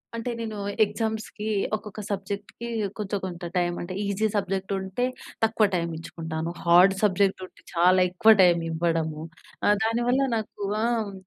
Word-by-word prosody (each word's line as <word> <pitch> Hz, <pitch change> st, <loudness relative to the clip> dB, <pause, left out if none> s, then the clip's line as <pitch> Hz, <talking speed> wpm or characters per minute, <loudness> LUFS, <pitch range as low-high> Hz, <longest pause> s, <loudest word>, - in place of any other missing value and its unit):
అంటే 230 Hz, +2 st, -3 dB
నేను 220 Hz, -2 st, -4 dB, 0.3 s
ఎగ్జామ్స్‌కి 215 Hz, 0 st, -4 dB, 0.3 s
ఒక్కొక్క 210 Hz, 0 st, -7 dB
సబ్జెక్ట్‌కి 200 Hz, +3 st, -5 dB, 0.3 s
కొంచెం 205 Hz, -1 st, -2 dB
కొంత 175 Hz, -2 st, -7 dB
టైమ్ 175 Hz, -1 st, +1 dB
అంటే 175 Hz, +2 st, -5 dB
ఈజీ 200 Hz, +2 st, +1 dB
సబ్జెక్ట్ 195 Hz, -1 st, -1 dB
ఉంటే 190 Hz, +6 st, -2 dB, 0.4 s
తక్కువ 225 Hz, -1 st, +3 dB
టైం 170 Hz, -1 st, -1 dB
ఇచ్చుకుంటాను. 160 Hz, 0 st, -5 dB
హార్డ్ 175 Hz, +3 st, +7 dB
సబ్జెక్ట్ 200 Hz, -1 st, +2 dB
ఉంటే -, -, -19 dB
చాలా 180 Hz, +2 st, +5 dB
ఎక్కువ 185 Hz, +5 st, +5 dB
టైం 175 Hz, -2 st, +5 dB
ఇవ్వడము. 160 Hz, -2 st, -1 dB, 0.4 s
ఆహ్, 205 Hz, -, +5 dB
దానివల్ల 240 Hz, +4 st, +1 dB
నాకు 215 Hz, -2 st, -5 dB, 0.2 s
ఆహ్, 230 Hz, -3 st, 0 dB
195 Hz, 140 wpm, -26 LUFS, 175-220 Hz, 0.4 s, హార్డ్